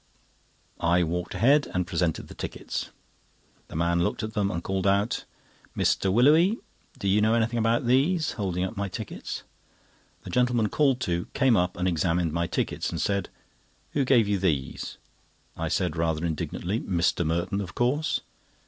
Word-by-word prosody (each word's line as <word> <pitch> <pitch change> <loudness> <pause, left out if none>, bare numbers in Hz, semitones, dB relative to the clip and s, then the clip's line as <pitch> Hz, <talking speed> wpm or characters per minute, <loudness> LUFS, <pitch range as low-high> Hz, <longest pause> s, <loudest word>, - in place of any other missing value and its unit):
I 85 +1 +3
walked 90 +2 -3
ahead 140 +9 +4
and 90 -1 +1
presented 85 -2 -1
the - - -10
tickets. - - -5 0.8
The - - -10
man 85 +1 +1
looked 85 - -1
at 110 0 -4
them, 100 -2 +1
and 85 -3 -3
called 95 0 -1
out: 100 +3 +1 0.5
"Mr. 95 - +2
Willowly! 155 - +5 0.4
do 100 - -3
you 100 +2 +4
know 110 +2 +3
anything 115 +1 +1
about 115 +2 +2
these?" 150 +7 +2
holding 90 -5 -2
up 95 +5 -3
my 100 -1 -2
tickets. 100 +1 -6 0.8
The - - -8
gentleman 125 -3 +2
called 135 -4 +2
to, 85 -6 -1
came 130 -4 +4
up 90 -2 +1
and 90 +1 0
examined 85 -1 +1
my 85 +1 0
tickets, - - -2
and - - -4
said: 100 -2 0 0.6
"Who 140 - +1
gave 125 -5 +4
you 100 -1 +1
these?" 75 -8 -2 0.6
I - - -3
said, - - 0
rather 80 0 0
indignantly: 85 +5 -2
"Mr. 85 -3 +1
Merton, 85 +5 -1
of 90 -4 -7
course." 140 +6 +1
100 Hz, 165 wpm, -27 LUFS, 85-120 Hz, 0.8 s, Willowly